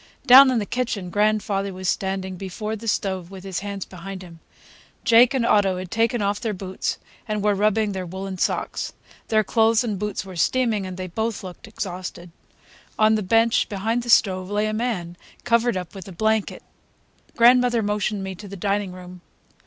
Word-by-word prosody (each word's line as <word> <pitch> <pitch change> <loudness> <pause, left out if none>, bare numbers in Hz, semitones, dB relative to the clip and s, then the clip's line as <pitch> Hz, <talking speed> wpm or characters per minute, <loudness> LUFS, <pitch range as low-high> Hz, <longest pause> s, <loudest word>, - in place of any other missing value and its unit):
Down 265 +1 +9
in 255 - +1
the 210 - -1
kitchen 210 -7 -3
grandfather 205 -1 +1
was 185 0 -5
standing 190 0 -2
before 195 +4 -5
the 225 +1 -9
stove 190 -4 -1
with 190 -1 -10
his 190 -2 -3
hands 200 -1 -5
behind 190 +1 -8
him. 170 -2 -13 0.7
Jake 235 +3 +6
and 245 -3 +1
Otto 195 -4 +3
had 185 -1 -7
taken 230 0 +1
off 200 +1 0
their 220 -4 -2
boots 190 0 -3 0.3
and 210 -2 -2
were 210 0 +3
rubbing 210 +1 +1
their 190 -2 -4
woolen 190 +1 -6
socks. - - -2 0.3
Their 215 -1 +3
clothes 225 +2 +3
and 210 -5 -3
boots 210 -1 -3
were 190 -1 -9
steaming, 215 +2 +1
and 185 -1 -7
they 185 - -4
both 220 +5 -3
looked 185 +5 -10
exhausted. 180 -4 -6 0.7
On 215 0 +4
the 215 - +1
bench 225 +4 +2
behind 220 +4 -1
the 240 - -8
stove 185 -4 +3
lay 210 +1 0
a 215 - -1
man, 205 -7 -3 0.3
covered 235 -2 +2
up 180 -2 -6
with 195 -2 -9
a - - -8
blanket. 220 +3 -1 0.7
Grandmother 240 -1 +5
motioned 205 -1 -1
me 190 0 -4
to 200 +3 -11
the 200 0 -8
dining 200 0 -1
room. 180 -1 -11
205 Hz, 185 wpm, -23 LUFS, 185-220 Hz, 0.7 s, Down